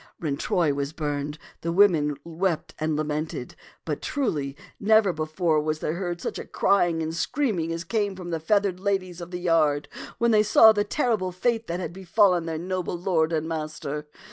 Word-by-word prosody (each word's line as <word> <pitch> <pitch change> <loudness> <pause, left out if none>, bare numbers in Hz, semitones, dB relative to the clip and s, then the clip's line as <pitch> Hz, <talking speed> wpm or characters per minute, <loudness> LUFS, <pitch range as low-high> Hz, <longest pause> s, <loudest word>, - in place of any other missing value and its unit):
When 150 -4 -2
Troy 155 0 +1
was 140 +1 -3
burned, 145 -1 -3 0.2
the 170 - -2
women 165 -6 +4
wept 170 0 -2
and 155 0 0
la 155 - 0
mented; 155 +1 -4 0.3
but, - - -3
truly, 150 - -2 0.2
never 215 -2 +4
before 155 0 0
was 155 0 -1
there 155 - -2
heard 175 -1 -3
such - - -4
crying 175 -5 +2
and 160 +1 -3
screaming 180 - -1
as 165 0 -3
came 205 +1 -1
from 180 -2 -7
the 165 - -1
feathered 195 +2 +1
ladies 185 -3 -2
of 170 - -7
the 180 - -4
yard 155 -4 +2 0.3
when 235 0 +2
they 215 -1 +5
saw 220 +1 +7
the 205 -1 +1
terrible 210 -5 0
fate 225 +5 -1
that 170 +1 -3
had 180 - -4
befallen 185 -2 +2
their 160 -1 -2
noble 180 +1 -3
lord 170 -3 +1
and 160 -1 -1
master. 155 -2 -4
170 Hz, 185 wpm, -25 LUFS, 155-195 Hz, 0.3 s, saw